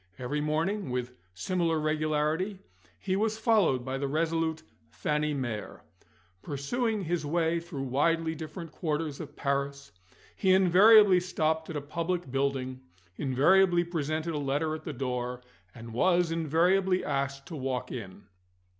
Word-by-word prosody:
Every 130 +4 -2
morning 165 +6 -1
(with 125 0 -3 0.2
similar 165 - 0
regularity) 155 +5 0 0.4
he 190 -1 -2
was 220 +2 0
followed 210 - +2
by 135 0 -3
the 140 - -1
resolute 160 +1 -1 0.3
Fanny 150 0 -1
Mere. 120 -7 -4 0.6
Pursuing 210 - -2
his 170 -2 -1
way 165 +2 +1
through 165 -5 -6
widely 160 +5 +1
different 160 +1 -7
quarters 150 -2 -3
of 150 -2 -8
Paris, 140 -1 -2 0.4
he 185 -2 +3
invariably 190 +1 +7
stopped 160 -3 -1
at 165 - -5
a - - -3
public 165 +1 -3
building, 135 -1 -1 0.4
invariably 175 +7 +4
presented 160 -1 -2
a 150 - -2
letter 145 +3 -1
at 155 0 -7
the - - -3
door, 125 -1 -3 0.3
and 115 -1 -9
was 175 +5 +2
invariably 180 +4 +2
asked 140 -1 -2
to 165 - -6
walk 130 -3 -3
in. 100 -5 -7
155 Hz, 135 wpm, -29 LUFS, 140-175 Hz, 0.6 s, invariably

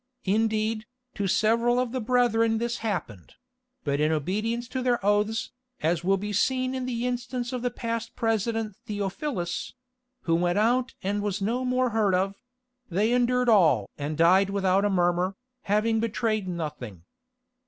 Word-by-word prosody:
Indeed, 215 +1 0 0.3
to 200 -2 -2
several 230 +5 +2
of 250 -2 -1
the 255 0 -2
brethren 230 -1 +2
this 235 +1 -2
happened; 175 - -4 0.5
but 140 -1 0
in 155 +1 +2
obedience 215 - -1
to 260 - -3
their 250 -1 +2
oaths, 210 +2 +1 0.3
as 165 +1 +1
will 195 +2 +3
be 210 +2 -4
seen 255 +4 +1
in 260 -1 -3
the 240 -1 -2
instance 245 0 -3
of 250 - -2
the 245 - 0
past 230 -1 -4
President 225 -2 -1
Theophilus—who 250 - -4
went 175 +2 +2
out 245 +4 +2
and 205 +2 -1
was 205 -1 -2
no 230 +6 -1
more 255 -1 +1
heard 210 -4 +2
of—they 245 +2 -3
endured 250 0 +2
all 160 - +4
and 150 +1 -4
died 185 +4 +5
without 195 0 +2
a - - +2
murmur, 180 0 +1 0.3
having 215 +2 +2
betrayed 220 -2 -1
nothing. 150 - -5
220 Hz, 150 wpm, -26 LUFS, 190-245 Hz, 0.5 s, died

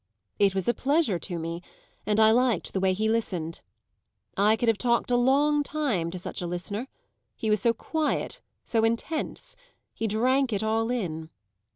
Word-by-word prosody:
"It 195 -1 +3
was 190 - -1
a 240 - +4
pleasure 280 - +1
to 175 +1 -5
me, 165 +1 -4 0.5
and 210 0 +2
I 220 0 +7
liked 240 -4 +1
the 190 - 0
way 190 0 +2
he 215 +3 0
listened. 180 -8 -1 0.7
I 210 +3 +4
could 235 +2 -2
have 225 -2 +3
talked 240 0 +1
a - - +4
long 285 +4 +3
time 280 - -1
to 180 - -6
such 180 - -5
a 175 - -3
listener; 200 +7 -4 0.5
he 220 - -1
was 210 - +3
so 235 - +4
quiet, 310 +6 -2 0.2
so 225 -1 +1
intense; 230 +8 -2 0.4
he 225 - -2
drank 255 +5 +2
it 205 +1 -1
all 225 +1 +1
in." 165 -10 -3
220 Hz, 180 wpm, -27 LUFS, 190-245 Hz, 0.7 s, I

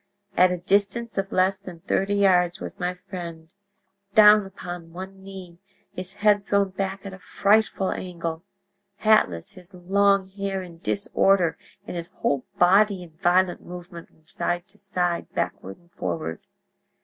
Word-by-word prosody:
At 180 +1 +5
a 180 - -1
distance 200 +5 0
of 195 0 -3
less 190 +1 +2
than 175 -3 -11
thirty 195 +2 0
yards 180 -3 +3
was - - -8
my 180 0 -1
friend, 170 -4 -8 0.7
down 210 -1 +7
upon 175 -3 -8
one 190 +2 -8
knee, 190 -3 -11 0.3
his 185 +1 -6
head 205 0 +2
thrown 200 -1 +2
back 195 +1 -4
at 195 - -6
a 190 - -10
frightful 200 0 +2
angle, 170 -3 -4 0.5
hatless, 200 - +2
his 185 +1 -13
long 195 +2 +2
hair 195 -1 -3
in 170 -2 -12
disorder 190 -3 +2 0.3
and - - -6
his 170 -1 -5
whole 140 -3 -1
body 195 +1 +4
in 170 - -13
violent 180 +1 +3
movement 175 -1 -9
from 160 - -30
side 175 +2 -3
to 210 +2 -17
side, 180 -3 -2
backward 95 +1 -3
and 175 0 -28
forward. 80 - -4
185 Hz, 150 wpm, -24 LUFS, 175-195 Hz, 0.7 s, down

